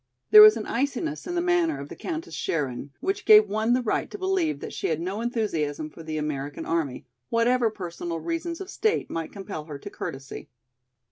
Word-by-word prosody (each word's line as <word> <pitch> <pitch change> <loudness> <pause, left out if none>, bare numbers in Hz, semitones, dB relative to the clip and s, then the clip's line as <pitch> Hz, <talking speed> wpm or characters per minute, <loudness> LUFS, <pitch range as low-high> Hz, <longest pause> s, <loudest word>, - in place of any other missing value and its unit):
There 215 - +11
was 215 +1 +9
an 215 - -4
iciness 285 +6 -2
in 350 - -3
the 345 - +1
manner 350 -2 +2
of 140 - -7
the - - -8
Countess 330 0 -5
Scherin 140 -3 -2
which 395 +2 -1
gave 430 -1 +8
one 220 +2 +1
the 250 0 +1
right 220 - -1
to - - -7
believe 375 -5 0
that - - -7
she - - -2
had 160 -1 0
no 190 +6 -3
enthusiasm 160 -11 -2
for 165 - -12
the 155 -1 -4
American 145 -2 -4
army, 160 -6 -2 0.2
whatever 235 0 +3
personal 175 -4 -5
reasons 335 - -3
of 390 0 -7
state 435 -1 0
might 165 -1 -4
compel 195 -6 -7
her 150 -3 -7
to - - -9
courtesy. 135 0 -7
215 Hz, 200 wpm, -26 LUFS, -, 0.2 s, There